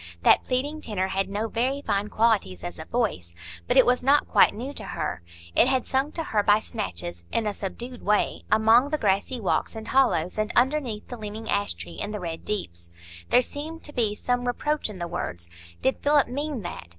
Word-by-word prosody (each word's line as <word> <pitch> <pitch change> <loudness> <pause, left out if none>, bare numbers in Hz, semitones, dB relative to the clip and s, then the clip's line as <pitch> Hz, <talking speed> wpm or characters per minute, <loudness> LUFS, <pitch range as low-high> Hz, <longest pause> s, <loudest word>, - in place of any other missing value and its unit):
That - - +6
pleading 285 +5 -2
tenor 190 -6 -2
had 195 0 -1
no 210 +3 -2
very 260 +5 -1
fine 205 -1 0
qualities 210 - +1
as - - -6
a - - -6
voice, 85 0 -2 0.3
but - - +2
it - - +8
was 250 +1 +3
not 280 +3 +4
quite - - +5
new 255 +6 -5
to - - -7
her; 155 - -4 0.3
it - - +5
had 260 -1 +1
sung 270 +3 0
to 330 - -3
her 215 -8 +1
by 205 +1 +4
snatches, 85 - -5
in 230 - +1
a 210 - 0
subdued 240 +6 -6
way, 210 0 +1
among 225 +5 +5
the 305 - 0
grassy 205 +3 0
walks 200 +1 0
and 220 0 -7
hollows, 200 -9 +2
and 215 +1 0
underneath 255 -4 +1
the 245 - -6
leaning 215 +1 -7
ash 100 -4 0
tree 85 -1 -9
in - - -3
the 210 0 -4
Red 165 -3 -6
Deeps. 85 - -4 0.4
There 250 - +5
seemed 315 +5 -6
to 295 - -9
be 220 -4 +1
some 245 +2 -1
reproach 295 +2 -1
in 210 - -8
the 175 -1 -4
words; 85 - -5 0.4
did 265 - +1
Philip 290 -1 +3
mean 280 -2 -3
that? 175 - -6
220 Hz, 210 wpm, -26 LUFS, 190-260 Hz, 0.4 s, it